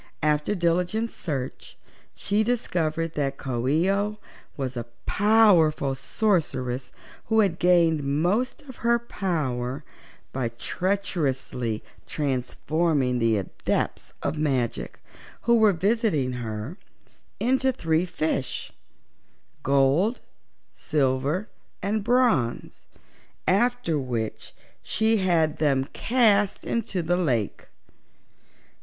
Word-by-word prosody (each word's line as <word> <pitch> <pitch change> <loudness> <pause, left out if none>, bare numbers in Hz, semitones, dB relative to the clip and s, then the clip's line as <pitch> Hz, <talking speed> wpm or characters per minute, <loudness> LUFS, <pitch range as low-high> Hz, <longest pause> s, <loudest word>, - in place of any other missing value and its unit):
After 150 +5 +1
diligent 180 +6 0
search 135 -6 -5 0.4
she 205 +2 0
discovered 165 -9 -1
that 140 -2 -1
Coo 125 -2 -3
ee 165 +7 +3
oh 205 +2 -1 0.4
was 130 -2 -3
a 120 -1 -4 0.2
powerful 190 -10 +4
sorceress 135 - -1 0.3
who 220 -1 +3
had 185 -5 0
gained 170 -3 +4
most 180 - 0
of 260 -4 -12
her 235 0 +3
power 150 - -2 0.5
by 130 -3 -1
treacherously 130 - -2 0.2
transforming 140 0 0
the 115 -2 +3
Adepts 95 - -2
of 155 - -1
Magic, 125 - -1 0.4
who 235 0 +4
were 220 -2 +6
visiting 195 - +1
her, 120 - -5 0.6
into 260 +2 +2
three 165 -7 0
fishes 155 -6 -2 0.9
gold, 140 - +3 0.5
silver 145 - 0 0.4
and 210 +1 0
bronze 235 - +1 0.6
after 205 -5 +2
which 120 -5 -4 0.3
she 220 +3 +1
had 170 -5 +2
them 135 -3 +2
cast 210 -5 +2
into 205 -6 -1
the 175 +2 +1
lake. 125 - -1
160 Hz, 100 wpm, -25 LUFS, 135-205 Hz, 0.9 s, were